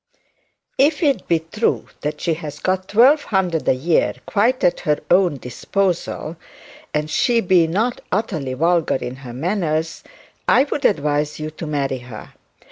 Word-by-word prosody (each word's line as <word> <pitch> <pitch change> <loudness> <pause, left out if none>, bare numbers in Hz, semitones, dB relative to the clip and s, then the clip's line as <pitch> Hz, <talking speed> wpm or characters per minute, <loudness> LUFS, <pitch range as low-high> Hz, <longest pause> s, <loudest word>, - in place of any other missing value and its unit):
'If 295 +4 +3
it 275 -10 +1
be 170 - +3
true 165 +8 -1 0.2
that 150 0 -4
she 170 - +1
has 155 -2 -7
got 185 +3 -1
twelve 265 +8 +5
hundred 185 -6 0
a - - +4
year 155 +6 +1
quite 240 +5 +1
at 180 - +3
her 150 -1 +1
own 180 -4 +4
disposal, 170 - -2 0.5
and 150 0 -1
she 235 +9 +2
be 180 -5 +3
not 220 +9 -1
utterly 165 - -2
vulgar 165 +3 +2
in 130 -1 -5
her 130 -3 -9
manners, 160 - -2 0.4
I 260 - +5
would 285 -1 -3
advise 150 -3 +1
you 155 0 -4
to 155 +1 -7
marry 140 -3 -1
her. 120 -3 -11
165 Hz, 155 wpm, -20 LUFS, 150-200 Hz, 0.5 s, twelve